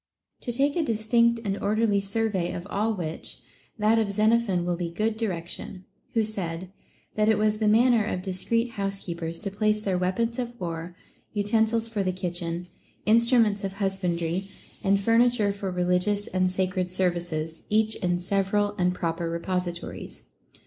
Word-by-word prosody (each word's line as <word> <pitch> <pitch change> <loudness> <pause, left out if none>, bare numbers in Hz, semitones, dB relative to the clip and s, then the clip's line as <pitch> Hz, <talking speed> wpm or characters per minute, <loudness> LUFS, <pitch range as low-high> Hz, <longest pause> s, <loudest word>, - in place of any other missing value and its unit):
To 245 - -4
take 275 +4 +1
a 345 - +2
distinct 235 -2 +2
and 200 -1 0
or 205 +2 +1
derly 215 -3 +2
survey 200 -3 -1
of 175 - -5
all 215 +2 +1
which, 165 -4 -4 0.4
that 220 +1 +4
of 210 -3 0
Xenophon 215 -3 +2
will 175 0 0
be 170 -1 -3
good 215 +6 0
direction, 185 -3 -4 0.3
who 225 - +4
said, 185 -4 -4 0.4
that 215 0 +2
it 220 - +4
was 215 0 +2
the 215 - +2
manner 230 +1 +5
of 185 -4 -3
discreet 230 +5 -1
housekeepers 175 -5 -3
to 200 -2 -3
place 215 +1 +1
their 195 -4 -1
weapons 230 +7 0
of 240 -1 -4
war, 170 0 -5 0.4
utensils 220 +2 +1
for 220 -3 -2
the 185 -1 +1
kitchen, 175 -1 -3 0.4
instruments 225 -2 +4
of 195 -1 -2
husbandry, 190 -3 -1 0.4
and 195 -1 +3
furniture 230 -1 +3
for 200 -1 -4
religious 180 +3 +1
and 185 0 +1
sacred 185 0 -1
services, 175 -3 -1
each 220 +1 +3
in 175 -1 0
several 195 +3 +1
and 180 0 +2
proper 165 0 -2
re 170 - -1
positories. 180 -1 -4
200 Hz, 160 wpm, -26 LUFS, 180-220 Hz, 0.4 s, manner